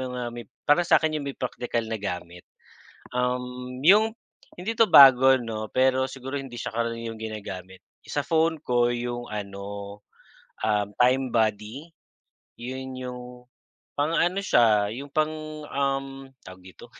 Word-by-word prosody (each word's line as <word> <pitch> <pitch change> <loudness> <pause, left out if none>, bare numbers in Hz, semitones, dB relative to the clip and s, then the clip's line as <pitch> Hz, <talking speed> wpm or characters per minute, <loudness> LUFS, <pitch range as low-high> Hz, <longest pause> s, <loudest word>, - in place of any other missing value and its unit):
mga 125 -1 -4
may 120 -3 -9 0.2
parang 170 +4 +3
sa - - +7
akin 155 -1 0
'yong 140 - -5
may 135 - -7
praktikal 120 -2 -3
na 110 -1 -4
gamit. 90 -3 -5 0.8
Um, 125 0 -3
'yong 210 +7 +5 0.4
hindi 215 +6 -5
'to 225 - +6
bago 135 - +8
'no, 110 -2 -6
pero 130 0 +3
siguro 135 +1 -6
hindi 135 -3 -8
siya 120 - -4
karaniwang 115 0 -3
ginagamit. 95 -4 -7 0.2
Sa 145 - -2
phone 160 0 +1
ko 120 -2 +1
'yong 120 0 -4
ano, 100 -1 -7 0.7
um, 105 -1 +1
Time 130 0 +3
Buddy. 110 +6 -1 0.7
Yun 130 +2 -6
'yong 125 -1 -6 0.8
pang 145 +3 0
ano 175 +3 +1
siya 105 -3 +3
yung 140 +3 -8
pang, 155 +1 0 0.4
um, 135 -1 -2 0.2
tawag 95 0 -12
dito 90 -1 -14
125 Hz, 140 wpm, -25 LUFS, 110-135 Hz, 0.8 s, bago